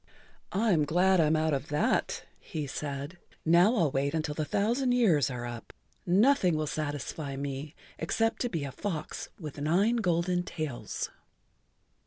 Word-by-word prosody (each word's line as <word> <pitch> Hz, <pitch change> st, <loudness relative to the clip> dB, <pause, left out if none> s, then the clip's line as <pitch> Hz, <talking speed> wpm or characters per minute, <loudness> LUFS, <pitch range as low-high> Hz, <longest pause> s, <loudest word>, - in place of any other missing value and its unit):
"I'm 195 Hz, -6 st, +3 dB
glad 180 Hz, +5 st, +3 dB
I'm 155 Hz, -1 st, +4 dB
out 155 Hz, 0 st, +1 dB
of 140 Hz, +1 st, -2 dB
that," 150 Hz, 0 st, 0 dB, 0.2 s
he 155 Hz, -2 st, -5 dB
said. 140 Hz, +4 st, -5 dB, 0.3 s
"Now 175 Hz, +8 st, +5 dB
I'll 165 Hz, -, +2 dB
wait 140 Hz, +3 st, 0 dB
until 155 Hz, -2 st, -1 dB
the 155 Hz, 0 st, -2 dB
thousand 240 Hz, -, +1 dB
years 175 Hz, -, +4 dB
are 120 Hz, -2 st, -4 dB
up. 120 Hz, -1 st, -7 dB, 0.3 s
Nothing 190 Hz, -, +4 dB
will 155 Hz, -, 0 dB
satisfy 145 Hz, -1 st, -3 dB
me 140 Hz, +2 st, -5 dB, 0.2 s
except 225 Hz, +7 st, 0 dB
to 245 Hz, -, 0 dB
be 165 Hz, -9 st, -2 dB
a 140 Hz, -, -4 dB
fox 160 Hz, -1 st, -4 dB
with 150 Hz, -4 st, -7 dB
nine 195 Hz, +10 st, +3 dB
golden 175 Hz, -3 st, +1 dB
tails." 155 Hz, -7 st, -4 dB
160 Hz, 150 wpm, -29 LUFS, 145-185 Hz, 0.3 s, Now